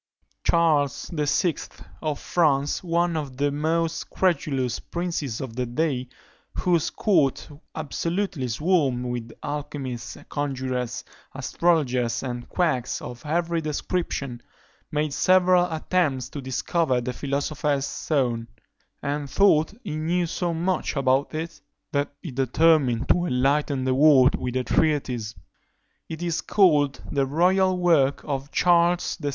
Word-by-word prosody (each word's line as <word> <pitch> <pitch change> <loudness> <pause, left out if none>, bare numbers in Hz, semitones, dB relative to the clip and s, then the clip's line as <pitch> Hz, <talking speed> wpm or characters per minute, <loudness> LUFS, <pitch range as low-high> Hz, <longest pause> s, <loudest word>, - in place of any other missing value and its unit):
Charles 155 -4 +2
VI. 150 +2 +1 0.4
of 155 -2 -2
France, 145 -4 +1
one 170 0 +1
of 140 -5 -4
the 145 +1 +1
most 160 +3 -1
credulous 135 -9 0
princes 165 -9 -3
of 125 -4 -6
the 125 -1 -2
day, 130 -1 -1 0.5
whose 170 -4 +1
court 165 - +1 0.3
absolutely 165 -1 -2
swarmed 135 -1 +1
with 120 -2 -4
alchymists, 145 -4 -5
conjurers, 130 -3 -3 0.3
astrologers, 130 -5 +1
and 120 -2 -5
quacks 155 -9 0
of 120 -1 -9
every 170 +1 0
description, 150 -5 -3 0.5
made 150 -1 -1
several 180 0 +4
attempts 155 -6 0
to 145 - -6
discover 130 +1 0
the 125 +1 -3
philosopher's 140 +1 -1
stone, 120 -8 -1 0.6
and 145 0 -2
thought 175 -4 +4
he - - -4
knew 170 +3 0
so 170 +1 -2
much 175 +2 -1
about 135 +2 +1
it, 165 0 -5 0.3
that 145 0 0
he 165 - -5
determined 135 -1 +2
to 175 0 +2
enlighten 135 +1 +1
the 130 0 +1
world 135 -2 +6
with 125 0 -3
a 130 - +1
treatise; 125 -8 0 0.7
it 160 +1 -5
is 170 -2 -1
called 150 -8 +3
the 140 -2 +1
_Royal 185 +5 +3
Work 160 -6 +3
of 140 -1 -3
Charles 175 0 +3
VI. 145 -4 -3
145 Hz, 125 wpm, -25 LUFS, 130-170 Hz, 0.7 s, world